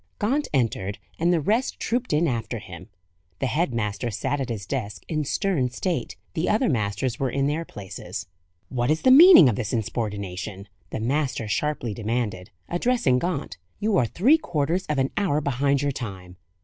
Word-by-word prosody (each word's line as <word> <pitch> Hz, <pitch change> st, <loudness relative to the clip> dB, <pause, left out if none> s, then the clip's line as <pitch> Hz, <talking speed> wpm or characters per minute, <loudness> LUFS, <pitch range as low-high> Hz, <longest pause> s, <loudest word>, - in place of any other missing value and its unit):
Gaunt 280 Hz, +7 st, 0 dB
entered, 115 Hz, -6 st, 0 dB, 0.2 s
and 170 Hz, +2 st, +3 dB
the 175 Hz, -, +3 dB
rest 220 Hz, -, 0 dB
trooped 245 Hz, +2 st, -1 dB
in 155 Hz, +3 st, +3 dB
after 115 Hz, -5 st, -2 dB
him. -, -, -10 dB, 0.5 s
The -, -, -2 dB
head 150 Hz, +3 st, 0 dB
master 105 Hz, 0 st, -2 dB
sat 135 Hz, +6 st, -2 dB
at 130 Hz, -, -3 dB
his 105 Hz, -5 st, -4 dB
desk 105 Hz, -3 st, -4 dB
in 155 Hz, -2 st, -1 dB
stern 155 Hz, -5 st, 0 dB
state: 170 Hz, +8 st, -3 dB, 0.2 s
the 160 Hz, -, -1 dB
other 220 Hz, +5 st, +2 dB
masters 110 Hz, 0 st, -1 dB
were 135 Hz, -, 0 dB
in 135 Hz, +2 st, 0 dB
their 155 Hz, +4 st, -1 dB
places. 100 Hz, -, -7 dB, 0.4 s
"What 120 Hz, -1 st, -1 dB
is 155 Hz, +1 st, +1 dB
the 260 Hz, -, +6 dB
meaning 305 Hz, -, +10 dB
of 115 Hz, -, +1 dB
this 115 Hz, -2 st, -3 dB
insubordination?" 100 Hz, -3 st, -3 dB, 0.2 s
the -, -, -4 dB
master 130 Hz, -1 st, -1 dB
sharply 120 Hz, +2 st, -1 dB
demanded, 110 Hz, -4 st, -3 dB, 0.2 s
addressing 175 Hz, -, +2 dB
Gaunt. 170 Hz, -, -3 dB, 0.2 s
"You 215 Hz, 0 st, +1 dB
are 120 Hz, -, +3 dB
three 260 Hz, -, +4 dB
quarters 175 Hz, -, -1 dB
of 150 Hz, -, -1 dB
an 135 Hz, 0 st, +1 dB
hour 185 Hz, -8 st, +2 dB
behind 140 Hz, 0 st, +1 dB
your 145 Hz, -, +1 dB
time." 95 Hz, -8 st, -7 dB
135 Hz, 175 wpm, -25 LUFS, 110-170 Hz, 0.5 s, meaning